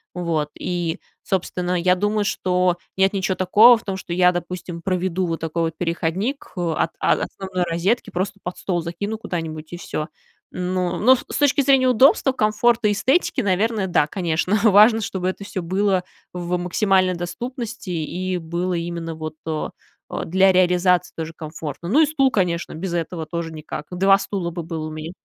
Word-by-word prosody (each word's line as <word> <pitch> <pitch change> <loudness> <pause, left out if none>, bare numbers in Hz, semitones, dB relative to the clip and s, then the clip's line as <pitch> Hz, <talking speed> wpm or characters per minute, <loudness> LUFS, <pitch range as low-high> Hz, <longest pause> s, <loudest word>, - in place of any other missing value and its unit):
вот, 165 -4 -1
и, 175 -1 -2 0.2
собственно, 180 -1 -1
я 180 +1 +4
думаю, 205 +2 0
что 180 -2 +1 0.2
нет 190 +1 +3
ничё 190 -1 0
такого 215 +7 +6
в 225 - -13
том, 195 -2 -3
что 180 -2 -6
я, 180 0 +5
допустим, 175 -1 -5
проведу 185 0 -1
вот 165 -1 -3
такой 165 +1 -2
вот 165 -1 -3
переходник, 175 - -2
э, 170 -2 0
от - - +1
о - - +2
основной 190 -2 -3
розетки, 175 +8 0
просто 195 +1 -3
под 180 - -5
стол 175 -3 -1
закину 200 +6 -4
куда-нибудь 160 -5 -5
и - - -4
всё. 155 -4 -4 0.5
Ну, 180 0 -1
но 255 +5 +6
с - - -7
точки 290 0 +3
зрения 265 -1 +4
удобства, 260 +2 +4
комфорта 225 0 +2
и - - +2
эстетики, 260 - +1
наверное, 205 0 +1
да, 160 -4 +3
конечно, 180 +2 0
важно, 220 +1 +6
чтобы 190 -3 -2
это 200 +2 -6
всё 190 -2 -4
было 190 +1 +1 0.3
в 180 0 -2
максимальной 185 +1 +2
доступности 235 +5 -6
и 180 +3 -2
было 175 +2 -2
именно 170 -1 -4
вот, 155 0 -6
э, 155 -1 -2 0.4
э, - - -3
для 190 +3 +4
реализации 180 0 +3
тоже 160 0 -5
комфортно. 155 0 -7
Ну, 275 - +4
и 315 - +6
стул, 275 -3 +2
конечно, 175 -4 -1
без 175 +2 -4
этого 165 -1 -3
тоже 165 +1 -4
никак. 155 -1 -7
2 195 +2 +4
стула 195 -3 -3
бы 170 0 -5
было 160 -1 -5
у - - -7
меня. 155 +2 -6
180 Hz, 180 wpm, -22 LUFS, 170-200 Hz, 0.5 s, такого